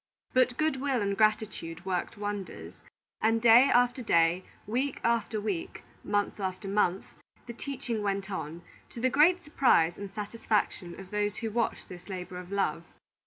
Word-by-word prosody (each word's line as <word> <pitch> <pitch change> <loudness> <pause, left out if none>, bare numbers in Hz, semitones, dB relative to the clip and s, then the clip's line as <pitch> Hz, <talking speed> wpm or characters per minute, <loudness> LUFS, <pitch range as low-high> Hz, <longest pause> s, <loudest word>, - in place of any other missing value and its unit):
But 255 -1 +3
good 310 -4 0
will 270 -3 +1
and 200 -1 0
gratitude 200 -5 0
worked 185 0 -2
wonders; 205 -2 -6 0.4
and 225 +1 +3
day 235 +3 +7
after 245 +1 +3
day, 170 -4 +3 0.2
week 255 +6 -1
after 230 -2 +1
week, 200 - -4 0.2
month 205 0 -1
after 190 +1 -4
month, 195 -2 +1 0.4
the 235 - -7
teaching 245 -3 -4
went 200 -1 -2
on, 170 -2 -5 0.3
to - - -8
the 255 +2 +2
great 345 +6 +4
surprise 245 - +3
and 200 -1 -6
satisfaction 210 -4 -2
of 190 -1 -11
those 210 0 0
who 225 -1 -4
watched 235 +1 -1
this 180 +2 -11
labor 180 -1 -6
of 180 +1 -10
love. 180 -5 0
210 Hz, 160 wpm, -29 LUFS, 190-240 Hz, 0.4 s, day